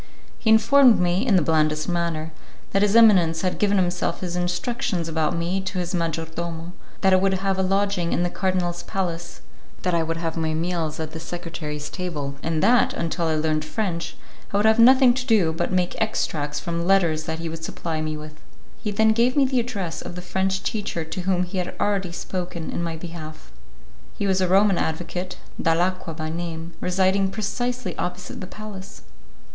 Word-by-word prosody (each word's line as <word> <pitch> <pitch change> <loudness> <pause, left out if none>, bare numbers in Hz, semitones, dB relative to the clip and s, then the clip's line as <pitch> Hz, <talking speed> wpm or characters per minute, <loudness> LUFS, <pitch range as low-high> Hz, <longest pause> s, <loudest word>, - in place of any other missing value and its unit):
He 225 - 0
informed 230 +3 +6
me, 180 +6 +1
in 210 - +4
the 180 - +4
blandest 155 -1 +1
manner, 170 -3 -1 0.4
that 195 - +2
his 205 +1 +3
eminence 185 -8 +6
had 185 - -1
himself 190 -3 +2
given - - -7
his 175 - -4
instructions 180 0 -1
about 160 +1 0
me 175 +3 -1
to 190 0 -4
his 175 0 -2
majordomo, 165 0 -3 0.3
that 190 -1 +4
I - - +7
would 190 0 +2
have 190 0 -1
a - - +3
lodging 195 -2 +1
in 175 - +1
the 175 - -1
cardinal's 180 -3 -1
palace, 175 -3 -4 0.4
that 180 - +1
I 170 - +3
would 165 0 -2
have 165 -1 -3
my 160 -1 -1
meals 165 -2 -2
at 160 -1 -4
the 160 - -6
secretaries' 160 -3 -5
table, 155 -7 -4
and 160 0 -1
that, 240 +3 +4
until 165 0 -1
I 160 - +1
learned 155 0 0
French, 170 -1 -3 0.3
I 200 - +1
would 205 - +2
have 220 +1 +5
nothing 255 +1 +7
to 255 +1 -2
do 205 -10 +3
but 170 +2 -2
make 180 -1 0
extracts 150 -9 -1
from 170 0 -3
letters 170 -5 +3
that 160 0 -3
he 165 0 -4
would 160 0 -6
supply 160 -1 -3
me 155 0 -3
with. 155 0 -10 0.4
He 215 - -2
then 220 +2 +3
gave 240 +4 +2
me 280 - +5
the 260 -1 +1
address 195 -9 -3
of - - -7
the 180 - -5
French 190 +1 -1
teacher 200 -6 -2
to 160 +3 -5
whom 180 0 +1
he 185 +1 -3
had 180 - -4
already 195 -3 0
spoken 175 -1 -4
in - - -3
my 165 -1 -2
behalf. 155 - -9 0.7
He 205 - -1
was 190 -1 +2
a 185 - +3
Roman 195 +1 +4
advocate, 175 +3 -3 0.2
Dalacqua 175 0 0
by 155 -1 -3
name, 165 0 -5
residing 190 +1 +2
precisely 235 0 -3
opposite 180 0 -4
the 185 - -6
palace. 210 -1 -9
175 Hz, 195 wpm, -24 LUFS, 165-195 Hz, 0.7 s, I